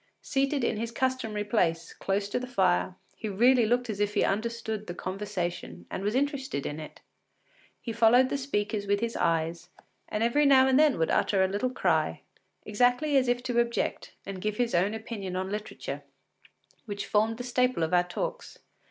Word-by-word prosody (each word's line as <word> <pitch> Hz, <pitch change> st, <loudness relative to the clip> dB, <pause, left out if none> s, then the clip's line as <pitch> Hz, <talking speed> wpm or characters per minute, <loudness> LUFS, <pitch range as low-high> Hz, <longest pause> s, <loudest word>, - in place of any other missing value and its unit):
Seated 275 Hz, -1 st, 0 dB
in 225 Hz, -, 0 dB
his 230 Hz, +2 st, -3 dB
customary 235 Hz, -4 st, -1 dB
place, 170 Hz, -6 st, 0 dB
close 200 Hz, +1 st, -1 dB
to -, -, -1 dB
the 255 Hz, -, -6 dB
fire, 185 Hz, -5 st, +1 dB, 0.2 s
he 215 Hz, -, -5 dB
really 240 Hz, +3 st, +4 dB
looked 245 Hz, +2 st, +1 dB
as 210 Hz, -3 st, -4 dB
if 205 Hz, +1 st, 0 dB
he -, -, +3 dB
understood 220 Hz, 0 st, -2 dB
the 175 Hz, -, -5 dB
conversation 185 Hz, -2 st, -4 dB
and -, -, -4 dB
was 205 Hz, +3 st, -1 dB
interested 270 Hz, -, -1 dB
in 145 Hz, -, -4 dB
it. 155 Hz, -, -10 dB, 0.8 s
He 230 Hz, -, -5 dB
followed 235 Hz, +3 st, +5 dB
the 280 Hz, -, -1 dB
speakers 205 Hz, -6 st, -2 dB
with 200 Hz, 0 st, +2 dB
his 230 Hz, +1 st, -2 dB
eyes, 165 Hz, +1 st, -1 dB, 0.4 s
and 210 Hz, -, -1 dB
every 285 Hz, +5 st, +3 dB
now 265 Hz, -1 st, +6 dB
and 265 Hz, +1 st, +4 dB
then 305 Hz, -3 st, +4 dB
would 160 Hz, -, +1 dB
utter 195 Hz, -2 st, +2 dB
a -, -, +3 dB
little 205 Hz, +7 st, -1 dB
cry, 255 Hz, -, 0 dB, 0.4 s
exactly 245 Hz, +7 st, +2 dB
as 260 Hz, -2 st, +4 dB
if 245 Hz, 0 st, 0 dB
to 245 Hz, -2 st, 0 dB
object 235 Hz, 0 st, -1 dB
and 195 Hz, -2 st, -6 dB
give 210 Hz, +1 st, -2 dB
his 240 Hz, -1 st, 0 dB
own 190 Hz, +5 st, +2 dB
opinion 215 Hz, -5 st, -5 dB
upon 190 Hz, +1 st, -3 dB
literature, 210 Hz, +1 st, -5 dB, 0.8 s
which 200 Hz, -2 st, -4 dB
formed 220 Hz, +2 st, +1 dB
the 245 Hz, -, -5 dB
staple 250 Hz, -5 st, +1 dB
of 160 Hz, -, -1 dB
our 175 Hz, -, +6 dB
talks. -, -, -5 dB
220 Hz, 185 wpm, -28 LUFS, 195-250 Hz, 0.8 s, now